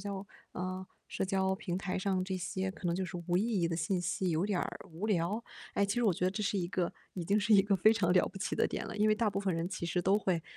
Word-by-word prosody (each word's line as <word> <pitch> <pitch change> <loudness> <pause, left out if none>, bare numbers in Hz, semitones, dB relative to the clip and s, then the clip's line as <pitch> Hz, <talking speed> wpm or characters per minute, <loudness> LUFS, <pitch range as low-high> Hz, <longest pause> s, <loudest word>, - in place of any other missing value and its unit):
交 200 0 -5 0.3
嗯， 185 +1 -3 0.2
社 - - -2
交 190 0 +1
平 190 -3 -3
台 185 -1 -2
上 185 -1 0
这 190 0 -2
些 185 +1 -2
可 190 -2 -9
能 170 - +1
就 190 - -1
是 180 - -5
无 175 - +3
意 215 +6 +2
义 170 - +2
的 165 - -1
信 180 +2 0
息 175 +2 -1
有 165 +4 +1
点 200 -4 0
儿 - - -3
无 175 +7 -4
聊， 205 +3 0 0.3
诶， 200 - +3
其 200 - 0
实 245 - +1
我 210 -5 +4
觉 180 - -2
得 185 - +2
这 210 +2 -2
是 200 0 0
一 175 - -1
个 175 -1 -1 0.2
已 175 -3 -3
经 200 +4 +3
是 215 +1 +4
一 195 - +7
个 200 -1 +2
非 215 +5 +6
常 180 -6 +2
了 180 - +4
不 195 - -8
起 - - -2
的 - - +3
点 - - -4
了。 - - -6
因 210 +1 +3
为 215 - +5
大 220 -1 +1
部 195 - -2
分 195 -3 0
人 165 +1 -1
其 180 -2 -4
实 175 +2 0
都 195 +3 +4
会， 180 -5 0
190 Hz, 325 characters per minute, -32 LUFS, 180-200 Hz, 0.3 s, 一